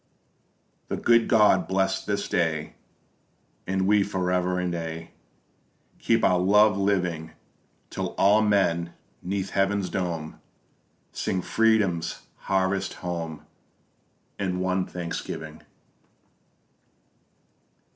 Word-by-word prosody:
_The - - -2
good 115 -1 +4
God 110 -3 +4
bless 95 0 0
this 100 0 -2
day, 80 -3 -1 0.9
And 95 0 0
we 105 +1 +4
for 95 -2 -1
ever 90 0 +1
and 90 -1 -2
aye 80 0 -6 0.9
Keep 115 0 +1
our 90 -1 +4
love 105 +3 +5
living, 90 -5 -1 0.6
Till - - -4
all 105 +2 +5
men 85 -5 +1 0.3
'neath 95 +1 -3
heaven's 100 -1 0
dome 85 -4 -4 0.7
Sing 95 - -2
Freedom's 105 -7 +1 0.2
Harvest 95 0 0
home 85 -3 -5 0.9
In 90 -2 -1
one 95 0 0
Thanksgiving! 80 -3 -6
95 Hz, 95 wpm, -26 LUFS, 85-100 Hz, 0.9 s, love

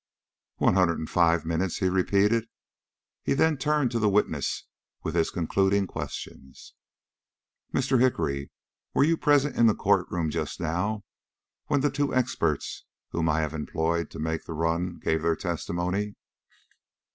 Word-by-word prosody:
"One - - +3
hundred 90 -3 +3
and 80 - -4
five 85 -2 +3
minutes," 85 +2 -1
he 95 - +1
repeated. 100 +4 +2 0.8
He - - 0
then 160 +2 +3
turned 145 -1 +1
to 115 - 0
the 105 -1 +3
witness 105 +1 0 0.4
with - - -3
his 85 -1 +2
concluding 95 +3 +1
questions. 65 -6 -8 1.0
"Mr. 130 -1 +2
Hickory, 80 - +1 0.5
were - - +5
you 165 +3 +4
present 145 -2 +2
in 115 - +6
the 110 - +4
court 100 -2 +2
room 85 -3 -1
just - - -3
now 90 +6 -1 0.6
when 145 -2 +2
the 145 0 +2
two 145 0 -1
experts 130 -1 -1 0.3
whom 80 -1 0
I 80 +1 +2
have 80 0 -2
employed 80 +1 -1
to - - -10
make 80 +1 -2
the 80 - -6
run 85 +2 -1
gave 80 -1 0
their 85 0 +2
testimony?" 90 +4 -2
90 Hz, 150 wpm, -27 LUFS, 80-115 Hz, 1.0 s, in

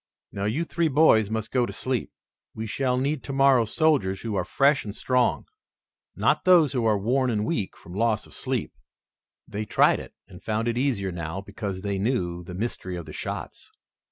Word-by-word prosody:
Now 100 0 -3
you 135 +11 0
three 170 0 0
boys 130 -8 +4
must 110 -1 -3
go 125 -2 +2
to - - -5
sleep. 130 -4 -3 0.4
We 110 - -4
shall 125 +3 0
need 140 +2 0
tomorrow 135 -3 +3
soldiers 110 - +1
who 115 -2 -4
are 95 - 0
fresh 140 +8 +2
and 105 -1 -7
strong, 125 0 +1 0.7
not - - +2
those 170 -6 +5
who 120 -4 +1
are 105 -1 +3
worn 125 +6 +1
and 105 -3 0
weak 110 - -2
from 85 - -13
loss 110 +2 +1
of - - -16
sleep." - - -3 0.7
They 105 +1 -4
tried - - +4
it - - -11
and 90 - -13
found 110 +3 -1
it 120 - 0
easier 120 -7 0
now 85 +1 -4
because 100 -1 -5
they 100 -1 -2
knew 90 -6 -1
the 90 +1 -8
mystery 95 -3 -4
of 85 -2 -6
the 75 - -10
shots. - - -6
110 Hz, 190 wpm, -25 LUFS, 100-130 Hz, 0.7 s, those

